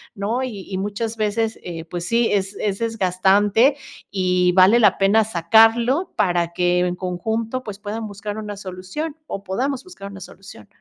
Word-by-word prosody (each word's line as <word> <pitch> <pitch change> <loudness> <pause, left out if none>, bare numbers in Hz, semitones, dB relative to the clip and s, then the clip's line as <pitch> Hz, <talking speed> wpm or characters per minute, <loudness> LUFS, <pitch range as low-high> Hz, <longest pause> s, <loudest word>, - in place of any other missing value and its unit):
¿no? 220 +6 -2
Y 235 -6 -5
y 190 - -2
muchas 210 +3 -3
veces, 220 +1 -1
eh, 165 -2 -6
pues 175 +1 -5
sí, 230 +4 +2
es 195 0 -1
es 200 -2 -1
desgastante 205 +3 +2 0.4
y 180 -2 +2
vale 190 +6 +6
la 220 - +4
pena 200 +3 +4
sacarlo 225 - +3
para 175 -2 +1
que, 180 0 +2
en 180 0 0
conjunto, 220 +7 -3
pues, 210 -3 -8
puedan 215 +2 -5
buscar 205 +1 -6
una 210 -1 -5
solución 190 - -6
o 200 - -5
podamos 255 +7 -2
buscar 275 - -10
una 195 - -10
solución. 195 +4 -13
205 Hz, 165 wpm, -21 LUFS, 185-225 Hz, 0.4 s, vale